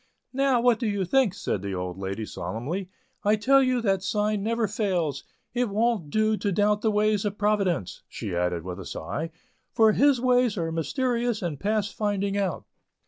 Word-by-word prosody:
"Now, 270 -2 +3
what 240 -2 +3
do 235 - -1
you 200 -2 0
think?" 245 -1 +2
said 105 - -2
the 100 -1 -4
old 90 0 -4
lady, 100 +3 -3
solemnly. 160 - -4 0.3
"I 210 +1 +4
tell 270 +6 +4
you 255 -2 +2
that 195 -3 +2
sign 210 +1 0
never 225 +1 0
fails. 190 -8 -1 0.3
It 245 -2 0
wont 215 -5 0
do 215 +4 +2
to 205 - -1
doubt 205 +2 +2
the 220 - +2
ways 210 -1 +2
of 205 -1 -2
Providence," 200 - 0
she 90 - -5
added 90 -1 -1
with 90 +1 -6
a 95 - -7
sigh, 150 - -4 0.4
"for 220 -1 +5
His 275 +3 +4
ways 250 -3 +2
are 165 -2 -1
mysterious 235 - -1
and 155 -6 -3
past 210 0 0
finding 200 -2 -1
out." 195 -5 -1
205 Hz, 185 wpm, -26 LUFS, 165-230 Hz, 0.4 s, for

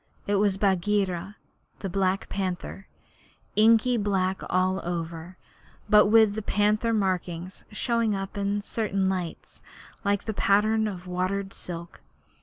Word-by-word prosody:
It 205 0 +1
was 200 -1 +2
Bagheera 195 -1 0 0.4
the 195 - -5
Black 190 +1 0
Panther, 190 0 -4 0.7
inky 230 +3 +5
black 190 -3 0
all 185 +1 +1
over, 170 +1 -5 0.5
but 210 0 +6
with 220 -1 +5
the 220 - -3
panther 210 +2 +1
markings 185 -3 -2
showing 230 -1 0
up 195 +1 -5
in 200 0 -1
certain 200 -3 -1
lights 180 -3 -5 0.4
like 200 -1 +1
the 220 - -3
pattern 215 +2 +2
of 185 -3 -6
watered 185 +2 -2
silk. 170 -1 -8
195 Hz, 125 wpm, -26 LUFS, 185-210 Hz, 0.7 s, but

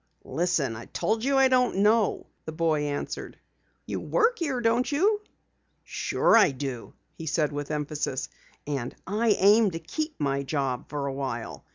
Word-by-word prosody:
"Listen, 155 -5 0
I 115 - -8
told 220 +1 -1
you 275 +1 +2
I 270 0 +6
don't 255 -4 +2
know," 210 +2 +2 0.2
the 160 - -5
boy 155 -2 +1
answered. 145 0 -4 0.5
"You - - -3
work 470 +1 +1
here, 285 -7 -1
don't 240 +3 +1
you?" 410 +8 +2 0.6
"Sure - - +2
I 230 - +7
do," 135 -3 -6 0.2
he 165 - -8
said 150 -1 +1
with 145 0 -4
emphasis. 150 -3 -2 0.4
"And 140 -5 -3
I 210 +2 +2
aim 205 +2 +5
to 165 -2 -5
keep 305 - -4
my 140 -1 0
job 135 -1 -2
for 145 -2 -3
awhile. 120 - -4
160 Hz, 160 wpm, -27 LUFS, 140-230 Hz, 0.6 s, I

